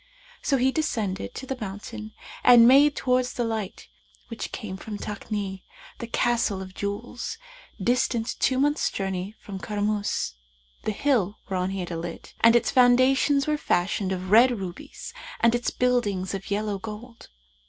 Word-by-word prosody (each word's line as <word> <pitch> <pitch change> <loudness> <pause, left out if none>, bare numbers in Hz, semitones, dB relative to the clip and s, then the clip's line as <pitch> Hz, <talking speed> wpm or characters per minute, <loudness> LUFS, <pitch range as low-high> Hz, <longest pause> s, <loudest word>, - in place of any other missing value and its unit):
So 275 - +2
he 260 +1 +3
descended 215 - -2
the 265 0 -5
mountain 215 +2 -7 0.3
and 240 -2 +8
made 280 +3 +6
towards 250 -1 +1
the 240 - -1
light, 220 -4 -4 0.4
which 230 - -5
came 210 -6 -5
from 210 +2 -7
Takni, 205 -2 -4 0.4
the 235 - -5
Castle 235 -4 +1
of 190 -1 -8
Jewels, 205 +6 -4 0.4
distant 235 +1 0
two 260 - +2
months' 290 +2 +2
journey 195 +1 -3
from 195 -2 -7
Karmϊs, 205 - -1 0.5
the - - +1
hill 215 -4 +1
whereon 185 -1 0
he 195 0 -3
had 175 - -5
alit, 165 0 -6
and 230 +1 +6
its 240 - +3
foundations 260 +3 +4
were 305 -1 +1
fashioned 190 -1 0
of 185 0 -4
red 235 +4 +8
rubies 190 - -8 0.3
and 230 0 +4
its 240 0 0
buildings 210 -7 0
of 195 -1 -5
yellow 205 0 -1
gold. 225 +3 -9
215 Hz, 150 wpm, -26 LUFS, 195-245 Hz, 0.5 s, and